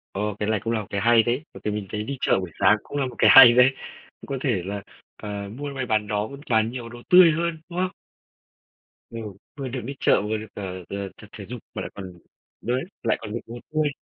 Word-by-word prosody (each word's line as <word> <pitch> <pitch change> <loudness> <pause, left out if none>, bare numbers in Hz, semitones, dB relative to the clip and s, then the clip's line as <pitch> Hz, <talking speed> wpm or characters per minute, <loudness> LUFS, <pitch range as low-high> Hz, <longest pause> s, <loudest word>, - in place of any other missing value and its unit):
Ơ, 100 - -2 0.2
cái 105 +1 -1
này 110 -2 +1
cũng 115 +3 -2
là 110 - 0
một 95 - -10
cái 100 -1 -2
hay 115 0 +5
đấy, 125 +6 -1
bởi - - -11
vì 105 - -1
mình 105 -2 -4
thấy 105 0 -3
đi 140 +3 -5
chợ - - +3
buổi 90 -3 -6
sáng 100 +2 +5
cũng 145 - -6
là 135 - +1
một 125 -2 -7
cái - - +5
hay 130 -3 +11
đấy. 125 +1 +6 0.5
Cũng - - -12
có 135 - -3
thể 115 -10 +1
là, 100 0 -4 0.4
ờ, 105 - -5 0.3
mua 145 0 -4
may 130 -2 -3
bán 110 -3 0
đó, 105 +1 -1
cũng 140 +1 -10
toàn 110 0 +2
nhiều 120 -2 -6
đồ 120 0 -11
tươi 180 -2 +8
hơn, 170 +1 -1
đúng 175 +1 -4
không? 185 0 +1 1.2
Ừ, 115 - -8 0.4
vừa 135 -2 -4
được 125 0 -4
đi 140 +1 -5
chợ, - - +3
vừa 110 +1 -2
được, 110 0 -8
ờ, 95 -2 -6
ờ, 100 -1 -4
tập - - -12
thể - - -8
dục - - -6
mà - - -4
lại - - -6
còn 95 -2 -8 0.5
đấy, 125 +4 -1 0.2
lại 115 - +1
còn 105 -2 -7
định 120 - -3
một 120 +1 -8
vui. 155 -1 +2
115 Hz, 260 wpm, -24 LUFS, 105-135 Hz, 1.2 s, hay